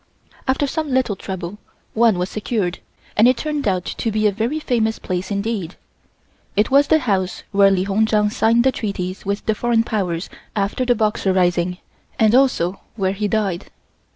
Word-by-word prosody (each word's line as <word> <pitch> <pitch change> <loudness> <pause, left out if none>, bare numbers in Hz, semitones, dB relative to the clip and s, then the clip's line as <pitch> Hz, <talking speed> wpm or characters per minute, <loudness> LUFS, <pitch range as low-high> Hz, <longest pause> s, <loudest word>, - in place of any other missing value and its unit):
After 265 +2 +2
some 305 +2 -2
little 255 -5 +1
trouble 190 +1 -6 0.3
one 225 -3 +4
was 180 +1 -1
secured, 205 -4 -2 0.4
and 220 +3 +6
it 255 -1 +4
turned 300 0 -2
out 185 -2 0
to 225 - -2
be 215 0 0
a 210 - +5
very 230 +9 -1
famous 225 -6 0
place 180 0 -4
indeed. 200 -3 -2 0.8
It 210 +5 +2
was 280 +1 +5
the 315 - +5
house 195 -6 -1
where 200 -1 +5
Li 190 -1 +2
Hung 205 +3 +1
Chang 210 -1 +2
signed 230 +2 +3
the 265 - +4
treaties 195 -5 -4
with 200 +1 -2
the 220 - +2
Foreign 230 +1 +1
Powers 190 -6 -2 0.3
after 205 +5 0
the 245 -1 +3
Boxer 210 -3 +1
Rising 180 -1 +1 0.4
and 220 -3 +4
also 245 -9 +2 0.2
where 190 -3 0
he 210 +1 -1
died. 205 -4 -1
210 Hz, 180 wpm, -20 LUFS, 190-235 Hz, 0.8 s, and